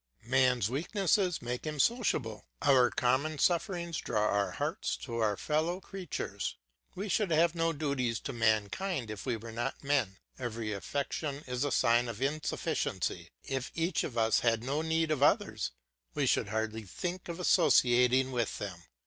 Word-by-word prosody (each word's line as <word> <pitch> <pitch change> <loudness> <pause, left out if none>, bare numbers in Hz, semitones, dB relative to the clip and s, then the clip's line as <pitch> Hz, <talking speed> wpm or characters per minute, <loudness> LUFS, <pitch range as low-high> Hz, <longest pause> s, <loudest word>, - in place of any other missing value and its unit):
Man's 125 -3 +3
weakness 175 - +1 0.2
makes 125 +5 -4
him 150 -1 -4
sociable. 130 - 0 0.2
Our 130 -3 +5
common 135 +5 +1
sufferings 170 0 0
draw 105 -2 0
our 100 0 0
hearts 155 +8 -2
to 120 -3 -4
our 105 -3 +1
fellow 160 - 0
creatures; 190 -4 -5 0.4
we 200 +3 -4
should 210 0 +1
have 165 +1 +3
no 165 -1 +1
duties 140 -7 -1
to 140 - -5
mankind 115 - 0
if 105 +4 -7
we 120 -3 0
were 115 +1 -9
not 120 +6 -4
men. 135 -9 +1 0.2
Every 115 -3 -3
affection 140 +6 -3
is 125 +1 -2
a 145 - 0
sign 120 0 +3
of 115 -2 -6
insufficiency; 145 +3 -2
if 135 -2 -3
each 165 +3 0
of 120 - -5
us 115 -1 +3
had 115 -1 +1
no 140 +4 -1
need 160 0 +1
of 150 -3 0
others, 145 - +2 0.5
we - - +1
should - - +2
hardly 110 +1 -2
think 175 - -5
of 170 +1 -5
associating 125 -5 +4
with 120 -3 -1
them. 95 -4 -6
130 Hz, 160 wpm, -31 LUFS, 115-160 Hz, 0.5 s, Our